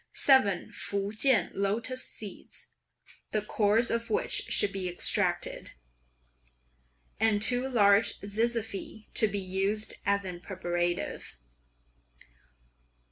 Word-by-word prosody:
Seven 235 -10 +3
Fukien 210 +5 +2
lotus 230 +6 -1
seeds, 210 -3 -9 0.6
(the 215 - +1
cores 215 +2 +1
of 230 0 -2
which 440 +4 0
should 205 - +3
be 190 -2 -3
extracted,) 175 - 0 1.5
and 220 -1 +3
two 245 +4 +2
large 205 -3 +3
zizyphi 220 0 -4
to 220 - +2
be 205 0 -4
used 195 +3 -1
as 200 -1 0
a 180 -2 -6
preparative. 175 - -3
205 Hz, 95 wpm, -29 LUFS, 195-230 Hz, 1.5 s, Seven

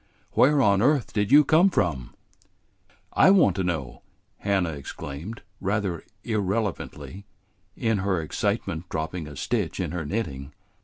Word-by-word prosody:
"Where 140 +1 +4
on 100 -2 +4
earth 140 0 +2
did 105 +1 0
you 145 +1 +8
come 170 +5 +5
from?" 80 - -1 1.0
"I - - +6
want 180 - +5
to 95 - 0
know!" 80 -9 -3 0.4
Hannah 95 -4 0
exclaimed, 75 - -7 0.2
rather 95 -4 -1 0.2
irrelevantly, 100 - -3 0.5
in 115 -3 +1
her 95 -2 0
excitement 80 +2 -2
dropping 80 +1 -4
a 75 - -9
stitch - - -2
in - - -2
her 85 -1 -3
knitting. 75 -6 -4
95 Hz, 135 wpm, -25 LUFS, 80-110 Hz, 1.0 s, you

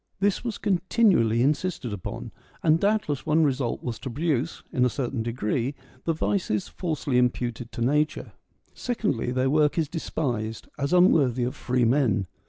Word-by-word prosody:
This 200 0 +1
was 235 -3 -3
continually 185 - +2
insisted 145 - -1
upon; 95 -4 -6 0.3
and 160 0 +4
doubtless 200 -9 0
one 155 +1 +3
result 135 -4 0
was 120 -3 -4
to 130 - -5
produce, 150 +2 -1
in 125 - +2
a 125 - +4
certain 125 -2 -3
degree, 120 +3 -1 0.3
the 165 - +2
vices 160 - -1
falsely 150 -7 -1
imputed 120 -1 -1
to - - -5
nature. 150 +5 0 0.4
Secondly, 210 - -1
their 130 +1 +1
work 150 +1 +3
is 160 -2 +1
despised, 125 -8 -3
as 140 +2 -1
unworthy 145 -9 +4
of 125 +4 -2
free 125 -2 0
men. 115 -6 +2
140 Hz, 155 wpm, -26 LUFS, 120-165 Hz, 0.4 s, and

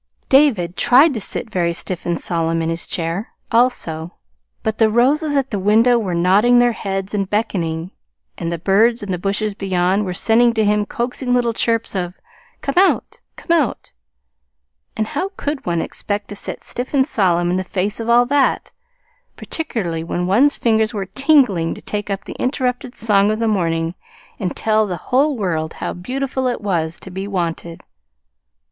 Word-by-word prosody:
David 225 - +3
tried 270 +5 +5
to 225 - -4
sit 220 - -5
very 170 -3 0
stiff 175 +1 -4
and 170 -1 0
solemn 165 -1 -1
in 165 - -1
his 165 0 -4
chair, 170 +5 -3 0.2
also; 175 -9 0 0.5
but 220 0 -2
the 220 -1 +5
roses 285 +7 +2
at 270 -1 0
the 205 - -1
window 225 +5 +4
were 190 -6 -2
nodding 200 +8 +4
their 240 0 +4
heads 195 -2 -4
and 195 -2 -1
beckoning; 180 -5 -2 0.4
and 165 - -4
the 170 - -2
birds 210 +7 +2
in 200 - -4
the 180 - -2
bushes 200 +3 -1
beyond 190 0 0
were 180 -2 -4
sending 235 +3 +3
to 220 -1 +2
him 210 0 +1
coaxing 245 +1 -1
little 240 -2 +1
chirps 230 -1 0
of 180 -1 -2 0.5
"Come 275 - -2
out, 385 - +2 0.2
come - - -6
out!" 310 -9 0 1.1
And 215 - +1
how 380 - -3
could 290 -6 -4
one 170 -1 0
expect 205 0 -4
to 205 - -6
sit - - -5
stiff 250 +4 -4
and 265 -1 +4
solemn 175 - +1
in 180 - +1
the 185 - -1
face 195 +3 -2
of 230 0 -4
all 240 +1 +5
that, 280 +2 +1 0.6
particularly 180 - -3
when 175 +1 -2
one's 240 +11 +3
fingers 220 -1 +1
were 195 -2 -2
tingling 230 - +2
to - - -11
take 210 -1 -4
up 195 -1 -3
the - - -7
interrupted 250 -1 -2
song 205 -2 +3
of 215 - 0
the 230 0 0
morning 165 -5 0 0.5
and 185 -2 -3
tell 215 -1 +2
the 180 -3 -3
whole 275 +2 +3
world 160 -6 -2
how - - -4
beautiful 260 +7 -3
it 245 - -1
was 170 -5 -2
to 190 - -10
be 190 +2 -5
wanted! 170 -3 -4
210 Hz, 180 wpm, -19 LUFS, 180-245 Hz, 1.1 s, tried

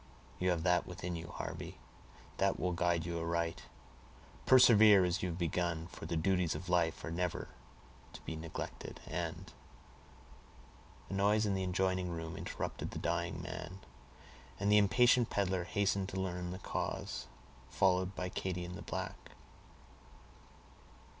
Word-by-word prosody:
You 90 - +2
have 85 -2 +1
that 90 0 +3
within 90 -1 -4
you, 80 0 -6
Harvey, - - -6 0.6
that - - +2
will 90 +4 0
guide 85 -1 +1
you 85 -1 -2
aright; 85 0 -2 0.8
persevere 110 -6 +8
as 90 +2 0
you 90 - -1
have 85 - -4
begun, 85 -1 -1
for - - -8
the 85 0 -1
duties 90 0 +1
of 90 - -6
life 85 -2 +1
are 80 - -4
never 90 +1 -2 0.6
to - - -10
be 80 - -5
neglected 80 0 -6
and"—a 85 0 -4 1.6
noise 105 +2 +3
in 100 - +1
the 95 -1 0
adjoining 95 0 0
room 80 -1 -5
interrupted - - -4
the - - -6
dying 85 0 -2
man, 85 +5 -6 0.8
and 100 +1 +2
the 105 - +8
impatient 120 +4 +4
peddler 95 -3 0
hastened 100 0 0
to 95 - -4
learn 90 -1 -2
the 90 - -5
cause, 95 - -3 0.4
followed 95 0 +2
by 90 - -2
Katy 90 -1 -3
and 90 - -7
the 90 - -7
black. - - -6
90 Hz, 145 wpm, -34 LUFS, 85-95 Hz, 1.6 s, persevere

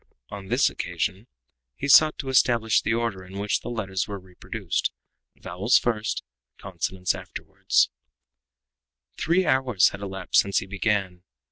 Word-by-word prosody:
On 100 -1 -8
this - - +3
occasion 100 +6 -3 0.5
he 140 - -4
sought 155 +2 +6
to 135 - -5
establish 115 -5 +3
the 115 - 0
order 115 -5 -2
in 95 +1 -10
which 100 +1 0
the - - -6
letters 95 -6 -3
were 100 -1 -5
reproduced 95 -1 -4 0.4
vowels 95 +6 +1
first, 110 -2 -1 0.3
consonants 90 0 -2
afterward. - - -11 1.5
Three 180 +3 +2
hours 130 - +3
had 95 - -9
elapsed 95 -2 +1
since 100 0 -2
he - - 0
began. 95 -2 -1
100 Hz, 135 wpm, -25 LUFS, 95-120 Hz, 1.5 s, sought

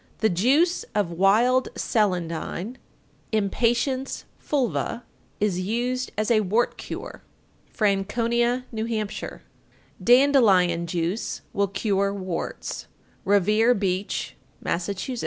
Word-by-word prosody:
_ - - -34 0.2
890. - - +6
The 190 - -1
juice 315 - +3
of 205 -5 +1
"wild 220 +9 +3
celandine" 185 +2 -1 0.5
(Impatiens 240 +5 0 0.2
fulva) 250 -3 -1 0.4
is 200 -4 +1
used 245 +6 -1
as 215 +2 0
a 225 - +5
wart 215 +4 +1
cure. - - -7 0.5
Franconia, 235 +4 +1
N.H. 225 +1 -2 0.3
891. - - -7 0.6
Dandelion 215 -10 +5
juice 170 +5 -2
will 200 0 +1
cure 200 0 0
warts. 185 -3 -5 0.4
Revere 210 +5 +4
Beach, 195 0 -2 0.2
Mass. 170 +3 -2
892. 230 +6 -4
215 Hz, 105 wpm, -25 LUFS, 195-240 Hz, 0.6 s, 890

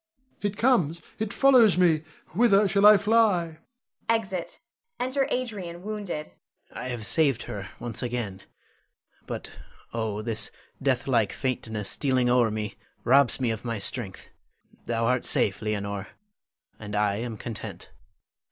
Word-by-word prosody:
It 205 -1 -2
comes, 180 - +2 0.2
it 220 -1 -2
follows 245 -9 +5
me. 170 -4 +4 0.3
Whither 210 -3 +5
shall 200 +1 +5
I 210 0 +9
fly? 200 -6 +2 0.5
[Exit. 195 -6 -1 0.4
Enter 260 +2 0
Adrian 195 -9 -3
wounded. 205 -7 -5 0.4
Adrian. - - -7
I - - -3
have 120 -4 -4
saved 140 -5 +2
her 100 -1 -6
once 120 -3 -3
again, 115 -6 -3 0.9
but - - -6 0.4
oh, 110 -2 -2
this 110 -2 0 0.3
deathlike 125 -5 +1
faintness 110 -6 -3
stealing 130 -3 +1
o'er 120 -2 +4
me 105 -1 -4 0.3
robs 135 +1 +4
me 125 -3 +1
of 110 -1 -5
my 115 -2 -2
strength. 100 -1 -3 0.6
Thou 115 -1 0
art 125 +1 +1
safe, 100 - +1
Leonore, 100 -2 -3 0.7
and 105 -1 -6
I 105 -1 +1
am 115 -1 -4
content. 115 0 -7
130 Hz, 135 wpm, -26 LUFS, -, 0.9 s, I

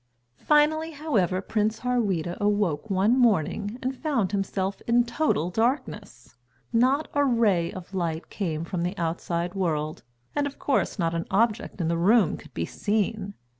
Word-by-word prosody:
Finally, 315 +2 +3
however, 200 - 0
Prince 215 +1 -1
Harweda 200 -9 0
awoke 205 -4 0
one 200 +5 +3
morning 215 - +1
and 260 +1 -1
found 255 - 0
himself 195 -1 -2
in 240 +1 +4
total 235 - 0
darkness. 215 - -2 0.4
Not 260 +6 +3
a 285 - +3
ray 215 -10 +2
of 185 0 -10
light 170 -3 -3
came 165 -6 -2
from 175 0 -3
the 180 +3 -2
outside 170 +1 -2
world, 155 -5 -2 0.3
and, 290 -1 +1
of 285 - -8
course, 275 - 0
not 165 -3 0
an 165 0 -3
object 220 0 0
in 170 - 0
the 170 0 0
room 200 0 +4
could - - -14
be 85 - -1
seen. 205 - -2
205 Hz, 155 wpm, -26 LUFS, 175-240 Hz, 0.4 s, in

